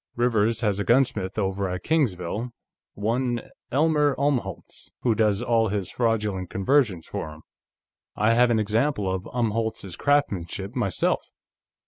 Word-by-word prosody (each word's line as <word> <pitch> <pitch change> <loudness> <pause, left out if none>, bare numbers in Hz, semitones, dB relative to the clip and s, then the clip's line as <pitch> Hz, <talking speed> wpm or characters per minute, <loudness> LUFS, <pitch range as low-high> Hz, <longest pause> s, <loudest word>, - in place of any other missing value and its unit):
Rivers 115 -2 +1
has 105 -3 0
a - - 0
gunsmith 110 -6 +1
over 95 -1 -1
at 90 0 -4
Kingsville, 115 - 0 0.5
one 120 +3 -1 0.2
Elmer 150 0 +3
Umholtz, 130 -10 -2
who 120 - +2
does 110 -1 +1
all 115 -2 +2
his 100 -2 -2
fraudulent 105 -6 -1
conversions 95 - +1
for - - -5
him. 75 +1 -13 0.7
I 110 +3 +3
have 120 +1 +4
an 115 - +3
example 110 +1 +1
of 95 0 -5
Umholtz's 110 -5 -2
craftsmanship, 100 - 0
myself. 100 -8 0
110 Hz, 130 wpm, -25 LUFS, 95-125 Hz, 0.7 s, have